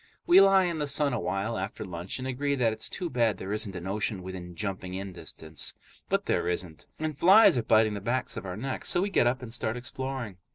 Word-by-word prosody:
We 180 +3 +8
lie 195 -1 +6
in 170 -3 -1
the 150 - -1
sun 140 -1 +2
awhile 100 +1 -2
after 95 +3 -5
lunch 90 0 -5
and 130 0 -5
agree 140 +2 -1
that 120 -4 +2
it's 110 - -3
too 180 - -3
bad 120 - +1
there 95 +2 -4
isn't 105 -2 -2
an 90 0 -6
ocean 100 0 -2
within 90 -1 -7
jumping 95 -2 -4
in 95 0 -5
distance. 80 -3 -5 0.3
But - - +1
there - - 0
isn't, 90 -2 -4
and 155 -1 -3
flies 190 +7 +7
are 120 - +1
biting 110 -1 +3
the 100 - -5
backs 120 +6 -1
of - - -5
our 90 -1 -5
necks, 130 +3 -3
so 175 - +2
we 200 - -2
get 120 - +4
up 125 +1 0
and 115 -2 -8
start 115 -1 -2
exploring. 130 -4 -5
110 Hz, 235 wpm, -28 LUFS, 95-135 Hz, 0.3 s, We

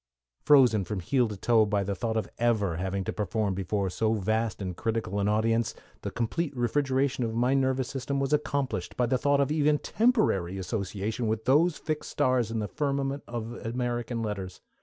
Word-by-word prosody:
Frozen 125 -9 +5
from 100 +2 -3
heel 120 +7 +1
to 105 -2 -6
toe 115 +2 +4
by 105 -1 0
the 100 +1 -2
thought 110 +3 -2
of 110 - -1
having 100 -5 0
to - - -3
appear 105 0 -1
before 95 +1 -1
so 110 +4 +1
vast 110 +2 -1
and 90 -3 -4
critical 110 0 -2
an 100 - +1
audience, 115 +2 +1 0.3
the - - -3
complete 140 +5 -2
refrigeration 130 +1 +1
of 115 -1 -2
my 125 +3 +2
nervous 130 -2 +1
system 140 +1 -2
was 135 +1 0
accomplished 145 -2 -1
by 125 - +3
the 125 +1 +1
thought 140 +1 +2
of 140 0 +2
even 150 -1 +3
temporary 180 - +1
association 100 +4 -3
with 110 0 -1
those 150 +6 +4
fixed 155 -1 -4
stars 130 -5 +1
in 115 - -3
the 105 -1 -1
firmament 140 0 -1
of 120 -1 -5
American 120 0 -2
Letters. 95 -4 -4
115 Hz, 180 wpm, -28 LUFS, 105-135 Hz, 0.3 s, Frozen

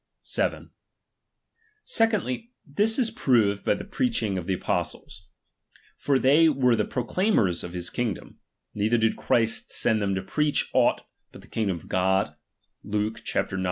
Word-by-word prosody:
7. - - -2 1.1
Secondly, 225 - 0
this 205 +10 +2
is 240 -4 +3
proved 105 -6 +2
by - - +2
the - - -7
preaching 200 - -1
of 90 -3 -3
iw" - - -14
the 95 - +1
apostles. 90 0 -4 0.7
For 140 -2 +1
they 145 +5 +5
were 125 -5 +3
the 105 -2 0
proclaimers 125 - 0
of 90 - -7
his 90 -1 -4
kingdom; 115 -7 -4 0.3
neither 110 +3 +1
did 110 -1 +1
Christ 115 -1 0
send 110 -2 +1
them 100 -1 0
to 95 - -3
preach 150 +8 0
aught - - +3 0.3
but - - -13
the - - -16
kingdom 100 -5 -1
of 80 - -14
God 95 -3 +1 0.5
(Luke 105 +2 -2
ix. 110 - -2
115 Hz, 155 wpm, -25 LUFS, 100-150 Hz, 1.1 s, they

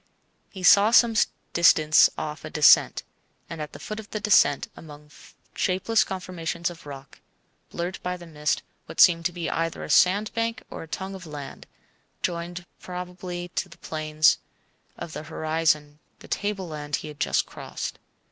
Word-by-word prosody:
He 190 -3 -10
saw 200 +3 +7
some 235 0 +5 0.4
distance 155 -2 +6
off 155 0 -5
a 155 - -6
descent, 150 -1 +5 0.4
and 165 -2 -7
at 150 - -6
the - - -8
foot 215 0 -6
of 220 - -10
the 215 - -4
descent, 170 -9 +4
among 150 -1 -13 0.4
shapeless 195 +5 +1
conformations 175 -2 -4
of 165 -3 -13
rock, 140 -1 -10 0.5
blurred 175 +2 -4
by 180 0 -3
the 175 - -12
mist, 150 -2 -2 0.2
what - - -9
seemed 170 -1 +6
to - - -10
be 175 -1 -4
either 165 0 -2
a - - -4
sandbank 220 +5 +2
or - - -7
a 165 - -9
tongue 190 +4 -5
of 185 -3 -9
land, 145 -2 -9 0.6
joining 175 0 -3
probably 180 0 -6
to 180 +1 -3
the 165 - -15
plains 155 0 +2 0.6
of 165 - -7
the - - -5
horizon 155 -1 -1 0.2
the - - -15
tableland 170 -8 -3
he - - -6
had 150 -1 -10
just - - +1
crossed. - - -7
170 Hz, 160 wpm, -25 LUFS, 155-185 Hz, 0.6 s, saw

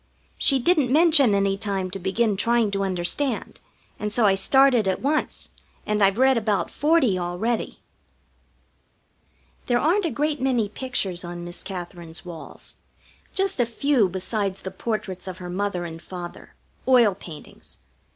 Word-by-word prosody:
She 275 - +4
didn't 280 -1 +2
mention 300 -7 +5
any 195 0 +1
time 195 -3 -2
to 195 - -5
begin 200 +4 +1
trying 230 +1 +2
to 195 0 -1
understand, 195 +8 -2 0.4
and 210 0 -3
so 230 +1 +2
I 195 - +5
started 245 +3 +4
at 190 - 0
once, 300 +3 -1 0.4
and 210 0 0
I've 195 +1 +4
read 260 -1 +4
about 210 -2 -1
forty 290 - +2
already. 180 +7 -2 1.9
There 245 - +3
aren't 345 +9 +2
a - - +1
great 295 -1 -1
many 245 -6 +1
pictures 205 -7 -2
on 175 0 -6
Miss 175 +1 -6
Katherine's 175 -3 -8
walls. 170 -3 -10 0.6
Just 390 -5 0
a 245 - +4
few 235 -3 +2
besides 195 +1 -3
the 190 - -6
portraits 190 -2 -4
of 185 -1 -6
her 180 -1 -6
father 195 -3 -2
and 165 -1 -8
mother, 175 -2 -8 0.3
oil 240 -6 +5
paintings. 170 -5 -12
205 Hz, 150 wpm, -24 LUFS, 185-260 Hz, 1.9 s, mention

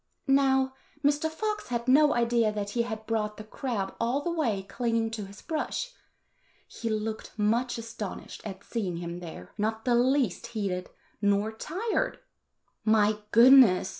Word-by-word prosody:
Now, 265 -1 +3 0.3
Mr. 290 +2 +2
Fox 425 +6 -3
had 235 0 -3
no 290 +3 +5
idea 235 -2 +2
that 205 -1 -4
he 235 - +1
had 220 -2 -4
brought 215 -1 -1
the 215 - -7
crab 215 -3 -3
all 240 +4 +1
the 345 - -1
way 235 - 0
clinging 230 +2 -1
to 215 -3 -4
his 200 +1 -13
brush. 335 +10 -3 0.8
He 230 - -5
looked 220 0 -3
much 230 +4 +1
astonished 225 -3 -7
at 195 -2 -7
seeing 195 -7 -3
him 170 0 -5
there, 160 - -9
not 220 +1 -1
the 245 - +3
least 245 -3 +2
heated 185 -3 -2 0.3
nor 205 +1 +2
tired. 365 - -2 0.7
"My 215 -1 +3
goodness!" 235 -6 +7
225 Hz, 150 wpm, -28 LUFS, 210-260 Hz, 0.8 s, goodness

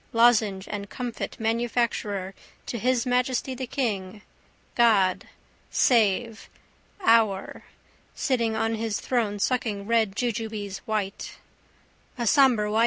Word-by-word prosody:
Lozenge 220 -5 +3
and 200 -1 -5
comfit 245 +1 -5
manufacturer 225 -4 -1 0.3
to 235 - -4
His 250 +1 +1
Majesty 250 +1 0
the 255 0 -5
King. 210 -6 -3 0.5
God. 205 -6 +3 0.4
Save. 225 -1 +2 0.6
Our. 220 -4 +2 0.5
Sitting 235 -4 0
on 225 +1 0
his 225 -1 -2
throne 225 -5 -1
sucking 210 -2 -1
red 220 -3 +1
jujubes 220 -4 -3
white. 210 -2 -3 0.8
A 240 - -2
sombre 235 -5 +4
Y. 220 - +1
225 Hz, 105 wpm, -25 LUFS, 205-240 Hz, 0.8 s, sombre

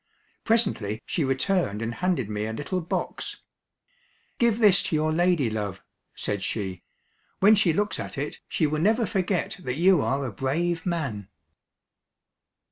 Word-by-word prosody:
Presently 195 - +1
she 165 - -1
returned 135 - +1
and 115 +1 -3
handed 175 - 0
me 105 0 -3
a 110 - -4
little 145 +9 -3
box. 170 - -3 1.0
"Give 235 -3 +3
this 205 -4 +5
to 180 -3 -1
your 155 +1 +1
ladylove," 135 - 0 0.3
said 100 -1 -2
she; 95 -3 -3 0.6
"when 205 +3 +7
she 200 -5 +4
looks 205 +6 0
at - - -6
it, 145 +2 -4
she 160 - +1
will 155 +1 0
never 220 +5 +3
forget 195 -1 -1
that 125 0 -2
you 180 -1 +5
are 135 0 0
a 125 - -3
brave 165 - -1
man." 135 - -2
155 Hz, 145 wpm, -26 LUFS, 115-190 Hz, 1.0 s, when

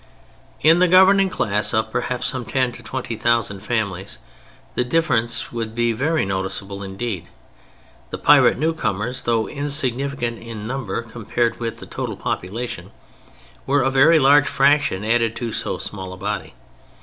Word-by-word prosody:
In 165 +3 +5
the 180 - +5
governing 190 +2 +6
class 105 - 0
of 110 0 0
perhaps 125 +2 -2
some 130 -2 -2
ten 130 +1 0
to - - -9
twenty 130 -3 -5
thousand 115 -3 +1
families 100 -3 -3 0.6
the - - 0
difference 125 -4 0
would 115 -2 -4
be 120 -1 +1
very 150 +5 0
noticeable 95 +1 -3
indeed. 100 -1 -5 0.8
The - - -5
pirate - - +5
newcomers, 125 -6 -1
though 115 -2 0
insignificant 140 -3 -2
in 115 -2 -8
number 120 -3 -3
compared 115 +1 -2
with 115 -1 -4
the - - -9
total - - -5
population, 115 +7 -4 0.8
were 140 0 +3
a 135 - +1
very 145 +5 +6
large 145 0 +5
fraction 140 -7 +2
added 115 0 +1
to 120 -1 -4
so - - -3
small 95 -2 -6
a - - -10
body. 105 +2 -4
120 Hz, 150 wpm, -21 LUFS, 110-135 Hz, 0.8 s, governing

